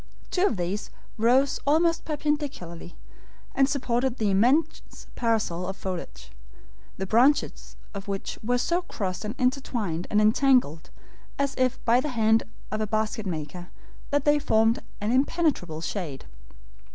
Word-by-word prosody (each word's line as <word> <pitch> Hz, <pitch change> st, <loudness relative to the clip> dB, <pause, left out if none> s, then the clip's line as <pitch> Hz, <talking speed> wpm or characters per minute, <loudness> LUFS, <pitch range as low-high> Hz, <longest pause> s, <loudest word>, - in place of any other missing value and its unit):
Two 375 Hz, +2 st, +3 dB
of 220 Hz, -, -2 dB
these 180 Hz, +4 st, -3 dB, 0.3 s
rose 250 Hz, +5 st, +3 dB
almost 330 Hz, +3 st, +3 dB
perpendicularly, 290 Hz, -, -3 dB, 0.6 s
and 270 Hz, 0 st, +3 dB
supported 255 Hz, -2 st, 0 dB
the 210 Hz, -3 st, +1 dB
immense 260 Hz, +11 st, +1 dB
parasol 215 Hz, -7 st, 0 dB
of 195 Hz, -, -5 dB
foliage, 60 Hz, -, -6 dB, 0.7 s
the 190 Hz, -, -3 dB
branches 245 Hz, +9 st, +2 dB, 0.2 s
of 200 Hz, 0 st, -7 dB
which 195 Hz, -1 st, -4 dB
were 245 Hz, +3 st, +1 dB
so 340 Hz, +8 st, 0 dB
crossed 195 Hz, -, -4 dB
and 215 Hz, +3 st, -4 dB
intertwined 240 Hz, -, -1 dB
and 210 Hz, -, +3 dB
entangled, 215 Hz, -, +3 dB, 0.5 s
as 280 Hz, -1 st, 0 dB
if 255 Hz, 0 st, +1 dB
by 240 Hz, +1 st, +5 dB
the 300 Hz, -, -2 dB
hand 225 Hz, -3 st, +3 dB, 0.3 s
of 215 Hz, 0 st, -2 dB
a 215 Hz, -, -1 dB
basket 215 Hz, 0 st, -1 dB
maker, 175 Hz, +1 st, -5 dB, 0.4 s
that 285 Hz, -1 st, 0 dB
they 295 Hz, 0 st, +4 dB
formed 225 Hz, -3 st, +2 dB, 0.2 s
an 210 Hz, +2 st, -1 dB
impenetrable 265 Hz, -, +1 dB
shade. 165 Hz, -7 st, -5 dB
225 Hz, 140 wpm, -26 LUFS, 190-275 Hz, 0.7 s, by